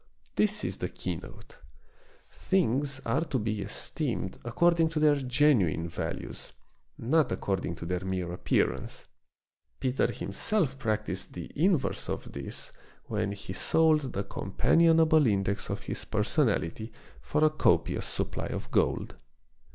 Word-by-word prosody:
This 210 0 +1
is - - -2
the - - -2
keynote. - - -7 0.7
Things 140 -6 0
are 135 +8 +1
to 150 -4 -1
be 110 -2 -1
esteemed 110 - -3
according 165 +7 +3
to 160 -1 -2
their 150 -1 +5
genuine 125 - +2
values, - - -5 0.4
not 150 +6 +2
according 95 -3 -2
to 85 - -7
their 90 +1 -2
mere 95 -2 -2
appearance. 90 - -1 0.7
Peter 130 -1 +1
himself 135 - -1
practiced 110 -6 -2
the 85 -2 -7
inverse 165 -1 +1
of - - -4
this 70 -1 -5 0.3
when 100 - -1
he 100 -2 -7
sold 155 +1 +3
the 100 - -1
companionable 160 +10 +3
index 100 -1 0
of - - -3
his - - -4
personality 110 +8 0 0.3
for 150 +1 0
a 155 - +5
copious 155 - +2
supply - - -2
of - - -5
gold. - - +1
125 Hz, 130 wpm, -29 LUFS, 100-155 Hz, 0.7 s, their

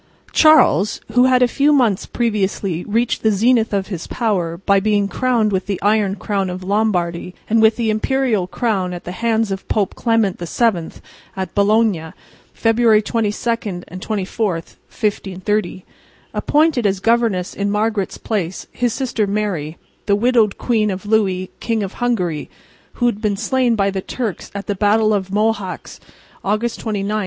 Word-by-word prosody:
Charles, 310 - +4
who 250 +1 +4
had 255 -1 +4
a - - +5
few 285 +4 +2
months 240 -9 +2
previously 200 -6 -1
reached 230 +3 0
the 220 - +3
zenith 225 +2 +2
of 200 -1 -1
his 180 -5 -5
power 180 -8 -1
by 195 +2 +2
being 205 0 +1
crowned 235 -2 +1
with 190 -1 -1
the 200 -2 -2
iron 205 -1 +2
crown 195 -1 -2
of 180 +1 -6
Lombardy 180 -4 -1
and 225 +1 +3
with 220 0 +5
the 225 -2 0
imperial 220 -3 0
crown 190 -4 -1
at 175 - -7
the 180 - -6
hands 225 +1 0
of 195 0 -5
Pope 205 -4 0
Clement 225 -5 0
VII 175 0 -1 0.4
at 190 0 -4
Bologna 200 -5 +2 0.4
(February 225 -1 +3
22 230 +2 -1 0.3
and 185 +2 -9
24, 210 0 -1
1530), 190 +2 -3 0.5
appointed 295 -7 +2
as 195 -1 -1
governess 225 -4 +1
in 200 0 -2
Margaret's 210 -1 -1
place 190 -5 -3
his 245 -2 -1
sister 240 -6 -1
Mary, 195 -7 -2 0.3
the 200 - +4
widowed 225 -1 +2
queen 220 -3 +1
of 190 +1 -5
Louis, 195 -4 +1
King 225 -2 -1
of 195 - -5
Hungary, 180 -11 -1 0.4
who 245 - -1
had 230 -3 0
been 205 -2 0
slain 255 0 +1
by 200 -2 +1
the 190 0 -3
Turks 220 -3 -4
at 200 - -5
the 205 - -1
battle 215 +2 +2
of 195 -2 -1
Mohacs, 205 -1 -2 0.4
August 215 +4 -1
29, 210 -3 -3
1526. 210 +2 -1
210 Hz, 160 wpm, -19 LUFS, 190-230 Hz, 0.5 s, a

